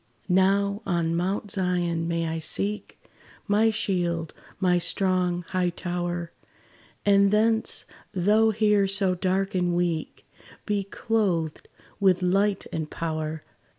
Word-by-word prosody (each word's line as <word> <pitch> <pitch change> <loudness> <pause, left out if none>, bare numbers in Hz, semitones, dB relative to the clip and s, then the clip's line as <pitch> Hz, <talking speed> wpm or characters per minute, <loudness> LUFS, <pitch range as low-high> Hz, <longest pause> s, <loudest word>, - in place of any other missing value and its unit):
Now 200 +3 +2
on 170 -3 0
Mount 190 +4 -1
Zion 175 -3 -1
may 170 -1 -1
I 160 0 -2
seek 200 +6 -1 0.5
My 215 +2 +3
shield 175 -7 -1 0.3
my 180 -2 +3
strong, 180 0 0
high 185 -1 +1
tower; 175 -1 -4 0.7
And 200 -1 +5
thence, 220 +2 +1 0.3
though 210 +4 +3
here 210 -2 +3
so 195 -1 +2
dark 190 +2 -1
and 180 -2 +1
weak, 175 -3 -2 0.4
Be 205 -1 0
clothed 195 -7 -1 0.3
with 190 -2 +3
light 195 +2 +1
and 160 -2 -3
power. 155 -1 -4
185 Hz, 120 wpm, -26 LUFS, 175-200 Hz, 0.7 s, And